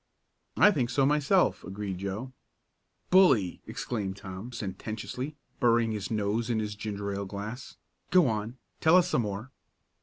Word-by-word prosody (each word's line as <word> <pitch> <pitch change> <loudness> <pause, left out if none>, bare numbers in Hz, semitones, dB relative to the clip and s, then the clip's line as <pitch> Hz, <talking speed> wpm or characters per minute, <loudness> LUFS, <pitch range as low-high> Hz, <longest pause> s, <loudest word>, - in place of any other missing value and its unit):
"I 210 - +7
think 125 -10 0
so 135 +2 +2
myself," 150 +6 +3
agreed 95 0 -5
Joe. 100 +7 -4 0.8
"Bully!" 135 - +5
exclaimed 100 -5 -3
Tom 95 +4 -8
sententiously, 110 +6 -5 0.2
burying 115 -1 +3
his 105 -3 -3
nose 110 +2 -1
in 115 - +1
his 105 -1 -2
ginger 100 -1 -4
ale 100 0 -3
glass. 105 +6 -7 0.3
"Go 180 -5 +5
on, 110 +2 -2 0.2
tell 160 +2 +5
us 180 - +4
some - - +2
more." 105 +4 -5
110 Hz, 145 wpm, -29 LUFS, 100-130 Hz, 0.8 s, I